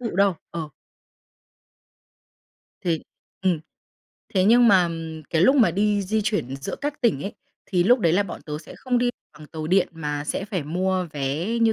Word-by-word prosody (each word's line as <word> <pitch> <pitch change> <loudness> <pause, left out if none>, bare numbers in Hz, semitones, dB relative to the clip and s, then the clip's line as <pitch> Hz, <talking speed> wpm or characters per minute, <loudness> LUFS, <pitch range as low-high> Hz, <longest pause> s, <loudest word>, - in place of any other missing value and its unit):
tự 235 -3 -3
đâu. 200 -2 +4 0.2
Ờ. 160 -3 -5 2.1
Thì 165 -3 0 0.4
ừm. 180 -5 +2 0.7
Thế 185 -1 +4
nhưng 235 +3 +6
mà 185 -3 +5 0.4
cái 165 +1 +2
lúc 265 +7 +5
mà 225 -9 +5
đi 205 +3 +1
di 215 +3 0
chuyển 135 - -1
giữa 135 - -5
các 295 +1 -3
tỉnh 220 - +2
ấy, 200 - -4 0.3
thì 180 -3 +2
lúc 245 +5 +5
đấy 170 -4 +3
là 200 - +4
bọn 195 - -8
tớ 150 -1 -5
sẽ 155 - -12
không 250 -2 0
đi 245 0 +2 0.3
bằng 155 - -11
tàu 155 0 -6
điện 185 +2 +3
mà 150 -2 -3
sẽ 190 - -2
phải 195 -6 -3
mua 185 +4 -1
vé. 145 +4 -2
Như 225 -1 +4
185 Hz, 185 wpm, -24 LUFS, 160-215 Hz, 2.1 s, nhưng